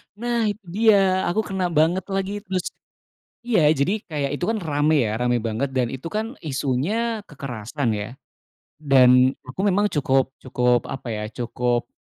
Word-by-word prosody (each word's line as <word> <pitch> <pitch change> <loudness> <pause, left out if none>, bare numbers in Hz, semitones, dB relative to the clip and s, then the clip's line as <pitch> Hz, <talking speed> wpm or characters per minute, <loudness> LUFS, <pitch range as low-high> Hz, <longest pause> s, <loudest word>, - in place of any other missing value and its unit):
Nah, 240 +2 -2
itu 205 +1 -6
dia, 195 -2 +3
aku 205 +5 +1
kena 190 -2 -1
banget 165 +4 +2
lagi 195 0 -2
terus 185 -2 -2 0.8
iya, 215 -10 +3
jadi 180 +10 0
kayak 145 -4 -2
itu - - -2
kan 225 +1 0
rame, 150 0 +2
ya, 110 +1 -2
rame 125 0 +1
banget, 115 +5 -2
dan 125 -2 +1
itu 135 +3 -7
kan 220 +7 -4
isunya 165 - -1
kekerasan, 130 -2 -4
ya. 105 +2 -4 0.7
Dan 130 -3 +5
aku 130 +8 -7
memang 205 +1 +3
cukup 135 -2 +1
cukup 125 -1 +1
apa, 130 - -6
ya, 105 -1 -3
cukup 120 0 -1
150 Hz, 155 wpm, -23 LUFS, 125-195 Hz, 0.8 s, Dan